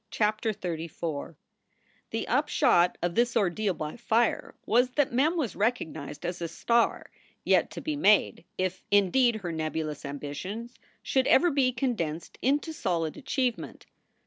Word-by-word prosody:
CHAPTER 215 +1 0
XXXIV 165 -5 -5 0.8
HTHE - - -2
upshot 175 +1 +3
of 175 0 0
this 240 +2 +2
ordeal 200 -1 +1
by 155 +4 -5
fire 235 0 0
was 245 +3 +3
that 285 -4 +1
Mem 300 +8 +2
was 250 - -2
1 - - -12
recognized 170 - -2
as 175 0 -4
a 170 - -1
star 235 +8 0 0.3
yet - - +3
to - - -7
be 310 -1 -2
made 210 - +3
if, 185 0 -2
indeed, 220 +5 +4
her 190 -6 -4
nebulous 155 -2 -3
ambitions 150 - -6 0.3
should 265 -1 +1
ever 345 +5 +5
be 270 -3 +2
condensed 195 - -3
into 290 +5 +1
solid 170 - -1
achievement. 260 -3 -3
210 Hz, 145 wpm, -28 LUFS, 170-245 Hz, 0.8 s, ever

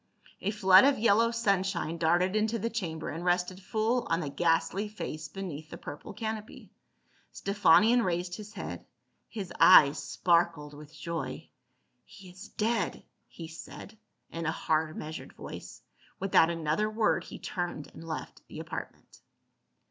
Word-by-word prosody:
A 195 - -1
flood 190 -2 +6
of 280 0 +4
yellow 230 +1 +4
sun 220 -5 +1
shine 170 -4 -3
darted 175 +4 +2
into 220 +2 +1
the 230 +2 -3
chamber 165 -8 -4
and 165 +3 -5
rested 180 +1 0
full 220 +5 0
on 165 - +2
the 150 -5 -3
ghastly 175 +6 +1
face 155 -7 -6
beneath 160 -3 -7
the - - -8
purple 145 - -8
canopy. 220 -1 -6 0.6
Stephanion 205 +4 +4
raised 175 -1 -1
his 210 0 -10
head; - - -6 0.5
his 195 -5 -6
eyes 145 -6 +8
sparkled 165 0 +1
with 150 +1 -12
joy. 165 +1 -5 0.3
" - - -46
He 190 -3 -14
is 185 +4 -11
dead," 230 +1 -1 0.2
he 165 - -9
said 165 +5 -10 0.4
in 165 -1 -4
a - - +2
hard 155 -1 -1
measured 155 +1 -7
voice. - - -10 0.4
Without 185 -4 +4
another 165 +5 0
word 215 0 +1
he - - -9
turned 175 -4 -5
and - - -11
left 160 -1 -6
the - - -10
apartment. - - -8
180 Hz, 150 wpm, -29 LUFS, 160-210 Hz, 0.6 s, eyes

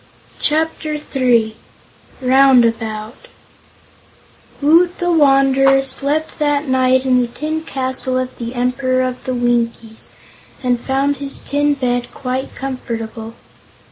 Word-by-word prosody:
Chapter 310 0 0
Three 245 -6 0 0.7
Roundabout 235 - +2 1.3
Woot 335 +5 +3
the 350 0 0
Wanderer 270 -3 +4
slept 280 +5 -1
that 290 -1 0
night 260 0 +2
in 255 -1 +3
the 245 - -1
tin 310 +6 -4
castle 260 -3 -2
of 255 0 -3
the 235 +1 -5
Emperor 255 +1 0
of 255 -1 -4
the 255 - -2
Winkies 235 -2 -2 0.5
and 245 -1 +1
found 275 +3 0
his 275 0 -1
tin 290 0 0
bed 245 -2 -2
quite 255 0 -4
comfortable. 230 -4 -6
260 Hz, 110 wpm, -17 LUFS, 245-285 Hz, 1.3 s, Wanderer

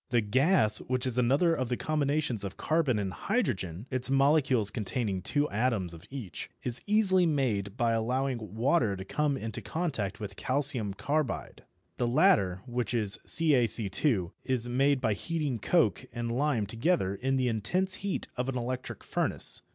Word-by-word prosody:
The 120 - +3
gas, 110 - +2
which 130 +1 -2
is 125 -1 -1
another 140 +8 +3
of 130 -6 -2
the 125 - -1
combinations 145 -7 0
of 95 -1 -6
carbon 155 -7 +1
and 95 -3 -2
hydrogen 105 - -2
(its 130 0 0
molecules 135 -6 +3
containing 105 -2 -2
two 145 - +1
atoms 105 -6 0
of 80 - -12
each), 125 -9 -7
is 120 -1 +2
easily 190 -4 +6
made 115 -9 -1
by 120 -2 +2
allowing 115 -2 -2
water 115 -3 +2
to 95 - -7
come 145 +5 0
into 110 -2 -5
contact 130 - -3
with 100 -2 -6
calcium 130 -7 0
carbide. 145 +3 -3 0.3
The 120 - 0
latter, 120 - +3
which 125 -1 -2
is 105 -4 +1
CaC_, 120 - +2
is 125 -3 0
made 135 +2 +2
by 110 -4 +1
heating 150 - -3
coke 110 - +1
and 120 0 -3
lime 130 -5 +1
together 115 - 0
in 135 +6 -1
the 130 -1 +1
intense 150 - 0
heat 200 -1 -3
of 125 +1 -2
an 130 - -2
electric 125 +1 -4
furnace. - - -1
125 Hz, 160 wpm, -29 LUFS, 105-145 Hz, 0.3 s, easily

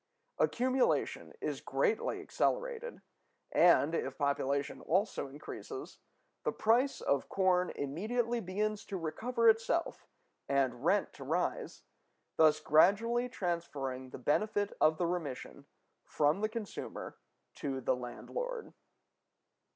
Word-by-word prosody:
Accumulation 255 +1 +1
is - - -3
greatly 465 0 0
accelerated, - - -2 0.5
and, 170 -3 +5
if - - -2
population 140 -1 0
also 195 -2 0
increases, 270 - -8 0.4
the - - +1
price 245 +5 +2
of 140 -1 0
corn 185 -2 +2
immediately 225 - -1
begins 210 +2 -2
to 195 - -4
recover 230 +9 0
itself 225 +10 +2 0.4
and 130 -3 +1
rent - - +2
to - - -9
rise, - - -2 0.5
thus 155 -1 +5
gradually 230 +10 +4
transferring 150 - -3
the - - -8
benefit 205 - 0
of 155 0 +5
the 175 - +1
remission 145 -4 -4 0.4
from 150 +6 +1
the 215 - +1
consumer 220 -2 -6 0.4
to 135 -4 -3
the 130 - +1
landlord. 460 - -5
185 Hz, 110 wpm, -33 LUFS, 145-235 Hz, 0.5 s, and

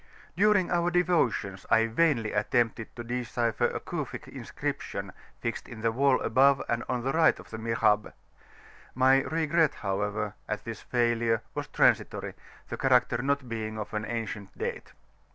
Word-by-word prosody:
During 205 0 +3
our 175 0 +2
devotions, 160 - +1
I 115 0 +5
vainly 115 -2 +1
attempted 115 +1 0
to 120 - -6
decipher 120 -1 -1
a - - -4
Cufic - - -5
inscription - - -5 0.3
fixed 115 -1 -3
in 115 -3 -9
the 115 0 +2
wall 135 +2 +3
above 135 +4 +4
and 120 0 -1
on 125 -1 -1
the 135 - 0
right 160 +1 +4
of - - -14
the 110 - -6
Mihrab, 110 -2 +1 0.8
my 130 +1 +5
regret 160 0 +1
however, 105 +1 -2 0.2
at 105 - -3
this 115 -2 -6
failure 115 -2 +1
was - - -4
transitory, - - +1 0.4
the - - -4
character 125 -3 +3
not 140 -1 0
being 110 -2 -4
of 110 - -6
an 105 0 -2
ancient 110 -3 -5
date. - - -5
120 Hz, 150 wpm, -28 LUFS, 110-135 Hz, 0.8 s, I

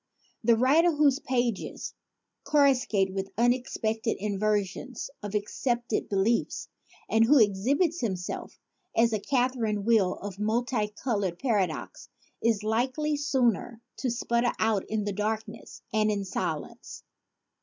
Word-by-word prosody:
The 230 +1 +5
writer 295 +9 +4
whose 290 -2 +3
pages 240 -6 -2 0.5
corruscate 255 -9 +3
with 195 0 -3
unexpected 235 -2 0
inversions 210 +5 -2
of 205 0 -5
ac 205 -1 0
cepted 240 -1 -2
beliefs 205 +4 0 0.4
and 225 0 +4
who 290 +5 +6
exhibits 265 - +2
himself 185 -6 -4 0.4
as 230 0 +4
a 215 - +1
catherine 235 -4 0
wheel 215 -6 +3
of 200 -1 -8
multicolored 215 -3 -1
paradox 200 - -2 0.3
is 225 -3 +1
likely 255 +8 0
soon 250 -5 0 0.2
to 255 - -1
sputter 235 0 0
out 220 -3 +1
in 215 -1 -1
darkness 215 +2 -4
and 215 0 +3
in 200 -2 -1
silence. 185 - -5
225 Hz, 115 wpm, -28 LUFS, 205-255 Hz, 0.5 s, who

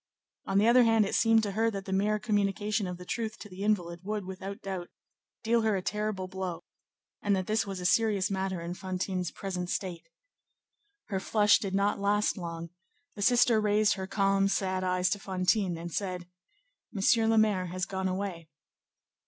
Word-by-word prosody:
On 195 - +1
the 210 +3 +4
other 245 +2 +7
hand, 225 -2 +4
it - - -4
seemed 225 -1 +4
to 205 - -1
her 225 +3 +1
that 195 -3 -5
the 190 - -3
mere 210 +2 +2
communication 205 -1 0
of 180 -1 -5
the 180 - -10
truth 220 +2 -3
to - - -10
the 185 -1 -10
invalid 175 -5 0
would, 205 0 -3
without 190 +1 -7
doubt, 185 -3 -5 0.5
deal 230 +1 +2
her 220 -2 +2
a 190 - -1
terrible 210 -2 -2
blow, 185 -2 -5 0.6
and 205 -1 +2
that 185 -1 -2
this 215 0 0
was 195 -2 -4
a 180 - -5
serious 205 0 +2
matter 190 -2 -2
in 170 +1 -4
Fantine's 185 -1 -3
present 180 -2 -5
state. 180 - -4 1.0
Her 195 -3 -1
flush 210 +1 +4
did 195 -2 -3
not 200 +1 +1
last 205 +1 +1
long; 170 -3 -6 0.4
the 205 - -8
sister 235 0 +4
raised 210 0 +3
her 190 -1 -5
calm, 195 0 +2
sad 190 -1 -1
eyes 180 0 +1
to 205 - 0
Fantine, 185 -1 0
and 170 +1 -6
said, 180 -3 -3 0.6
"Monsieur 225 +2 +3
le 225 0 +3
Maire 205 -4 +3
has 185 +1 -3
gone 190 0 -2
away." 185 -4 -4
195 Hz, 185 wpm, -29 LUFS, 185-210 Hz, 1.0 s, other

